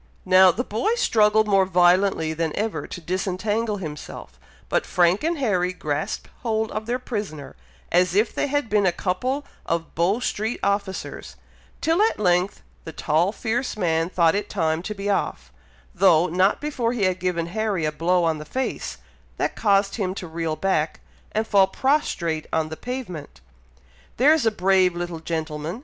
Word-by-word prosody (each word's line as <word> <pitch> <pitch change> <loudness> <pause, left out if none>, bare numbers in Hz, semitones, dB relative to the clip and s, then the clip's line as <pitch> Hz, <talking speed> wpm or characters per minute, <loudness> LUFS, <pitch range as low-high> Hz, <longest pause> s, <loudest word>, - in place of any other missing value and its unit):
Now, 185 0 +7
the 230 +7 0
boy 245 - 0
struggled 215 - +3
more 195 -2 +4
violently 180 -2 +3
than 160 -1 -2
ever 215 +1 -2
to - - -7
disentangle 195 +5 -1
himself, 150 - -8 0.3
but - - +1
Frank 180 - +2
and 335 +1 0
Harry 185 -9 0
grasped 155 -4 -3
hold 220 -2 -1
of 215 +1 -4
their 245 +1 0
prisoner, 205 - -6 0.4
as 180 +1 +3
if 215 +3 +2
they - - 0
had 290 -2 0
been 210 -2 +2
a - - +4
couple 250 +12 -2 0.2
of 165 -1 -3
Bow 180 +7 +1
Street 220 -1 -2
officers, 200 -1 -2 0.5
till 330 +4 +2
at 445 - +2
length 180 -1 +1 0.2
the 160 - -7
tall 160 +5 +1
fierce 235 +2 -2
man 165 -3 +1
thought 170 -3 +3
it 205 - -2
time 160 -4 0
to 210 +4 -5
be 195 0 -5
off, 65 - -2 0.4
though 175 -3 +5
not 185 +3 +2
before 255 -6 -1
he 230 -5 -1
had 185 -1 +1
given 180 -2 -1
Harry 200 -2 -1
a 155 - 0
blow 175 +3 +1
on 160 -2 +1
the - - -6
face, 260 - -4 0.4
that - - -1
caused 200 -1 +2
him 190 -3 -2
to 185 - -6
reel 160 -1 -3
back, 160 -4 0 0.3
and 220 +1 0
fall 200 -3 +4
prostrate 190 - 0
on 160 -1 0
the 160 - -5
pavement. 185 - -7 0.8
"There's 280 0 +4
a - - +4
brave 185 -3 +3
little 175 -1 -4
gentleman!" 160 +2 -4
190 Hz, 170 wpm, -23 LUFS, 170-220 Hz, 0.8 s, Now